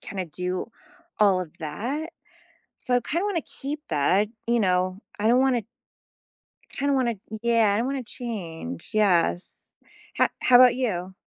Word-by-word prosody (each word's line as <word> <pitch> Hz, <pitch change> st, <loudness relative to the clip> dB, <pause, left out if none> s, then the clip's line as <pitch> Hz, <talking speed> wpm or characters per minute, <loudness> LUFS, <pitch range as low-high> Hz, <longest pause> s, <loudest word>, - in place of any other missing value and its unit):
kinda 190 Hz, -2 st, -5 dB
do 180 Hz, +5 st, -4 dB, 0.5 s
all 195 Hz, -3 st, +4 dB
of 170 Hz, -2 st, -8 dB
that, 250 Hz, -, -4 dB, 0.7 s
so 250 Hz, -, -1 dB
I -, -, +4 dB
kinda 340 Hz, -, -1 dB
wanna 390 Hz, -5 st, 0 dB
keep 290 Hz, +1 st, -6 dB
that, 170 Hz, +7 st, +2 dB, 0.2 s
you 235 Hz, 0 st, +3 dB
know? 185 Hz, -1 st, +1 dB, 0.2 s
I 215 Hz, -, +1 dB
don't 245 Hz, +2 st, +5 dB
wanna 250 Hz, -5 st, +2 dB, 1.1 s
kinda 280 Hz, 0 st, 0 dB
wanna 250 Hz, -3 st, +2 dB, 0.3 s
Yeah, 230 Hz, -3 st, +3 dB
I -, -, +1 dB
don't 230 Hz, -, 0 dB
wanna 275 Hz, -1 st, -2 dB
change, 175 Hz, -, -6 dB
yes. 185 Hz, -4 st, +1 dB, 0.4 s
Ho -, -, +5 dB
how 250 Hz, -, +7 dB
'bout 250 Hz, -1 st, +7 dB
you? 190 Hz, -8 st, -2 dB
215 Hz, 150 wpm, -25 LUFS, 185-255 Hz, 1.1 s, how